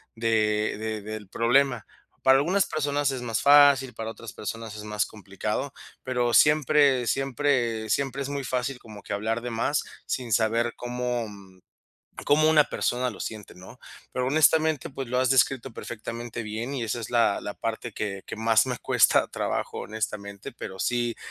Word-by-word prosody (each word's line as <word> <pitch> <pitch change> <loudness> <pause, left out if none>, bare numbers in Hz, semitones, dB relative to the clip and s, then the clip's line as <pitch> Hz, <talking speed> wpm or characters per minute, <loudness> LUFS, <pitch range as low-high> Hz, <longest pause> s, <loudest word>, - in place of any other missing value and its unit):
de 110 -2 +1
de 110 -1 -3
del 110 0 -7
problema. 125 +2 +2 0.4
Para 135 0 +6
algunas 185 +7 +2
personas 145 -2 0
es 130 -2 -4
más 115 -2 -2
fácil, 140 -3 +6
para 110 0 -5
otras 115 -1 -10
personas 115 0 -6
es 105 - -8
más 105 0 -1
complicado, 105 +6 -4 0.3
pero 125 -2 0
siempre 145 -4 +4
siempre 125 -4 0
siempre 135 -1 -1
es 135 - -3
muy 140 -1 -3
fácil 125 +1 -2
como 105 -4 -12
que - - -5
hablar 110 +3 -1
de 120 0 -5
más, 115 +6 0 0.2
sin 120 -4 -2
saber 115 +2 +2
cómo, 125 -1 -3
mm, 95 -2 -15 0.6
cómo 155 +2 +4
una 155 -1 +6
persona 125 0 -1
lo - - -12
siente, 110 -2 -6
¿no? 95 +7 -13 0.3
Pero 125 - -1
honestamente, 155 0 +3
pues, 135 -2 -6
lo 125 +1 0
has 130 - +2
descrito 135 -1 +2
perfectamente 115 +1 -6
bien 110 +5 -4
y 125 - -2
esa 115 +2 -2
es 115 - -7
la 115 -4 +2
la 105 - -5
parte 115 +1 -4
que 100 -2 -4
que - - -6
más 115 +1 +3
me 125 -1 -2
cuesta - - +3
trabajo, - - -3
honestamente. 105 -2 -5
Pero 95 -2 -8
sí, 120 +1 0
120 Hz, 170 wpm, -26 LUFS, 110-135 Hz, 0.6 s, Para